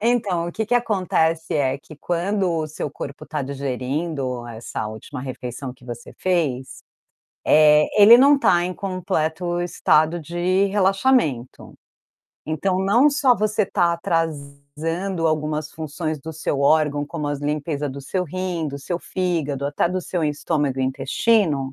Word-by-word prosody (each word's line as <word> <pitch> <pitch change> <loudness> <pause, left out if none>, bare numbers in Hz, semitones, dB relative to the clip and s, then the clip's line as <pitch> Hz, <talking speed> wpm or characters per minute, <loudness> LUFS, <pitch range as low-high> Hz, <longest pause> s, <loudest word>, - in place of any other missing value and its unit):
Então, 210 -7 +1
o - - -7
que 220 -1 -2
que 245 - +1
acontece, 180 -8 +1
é 135 -2 +1
que 155 +1 -14
quando 180 +4 -1
o 160 -2 -1
seu 150 -1 -5
corpo 140 0 -8
está 150 -2 -4
digerindo 135 -1 -3
essa 110 -1 -5
última 110 +5 -8
refeição 130 0 -6
que 125 -1 -20
você 120 -1 -8
fez, 150 -9 -1 0.6
eh, 150 0 +6 0.2
ele 230 +4 +10
não 280 +3 +6
está 175 -10 +3
em 180 +1 -3
completo 175 -3 -2
estado 170 -1 +2
de 175 +4 0
relaxamento. 195 - +1 0.7
Então 185 +4 0
não 235 +10 +4
só 280 -4 +3
você 215 -1 +1
tá 175 -4 +2
atrasando 165 +2 -2
algumas 155 -1 -1
funções 155 0 -4
do 160 +4 -8
seu 145 -2 -2
órgão, 145 0 +3
como 150 -3 -4
as 145 -1 -2
limpeza 145 0 -2
do 140 +1 -7
seu 180 +7 -2
rim, 180 -1 -3
do 140 - -6
seu 170 +5 -3
fígado, 155 -8 -2
até 145 +4 0
do 185 +1 -2
seu 175 -2 -2
estômago 145 -2 -1
e - - +1
intestino, 140 - +1
160 Hz, 150 wpm, -22 LUFS, 140-185 Hz, 0.7 s, ele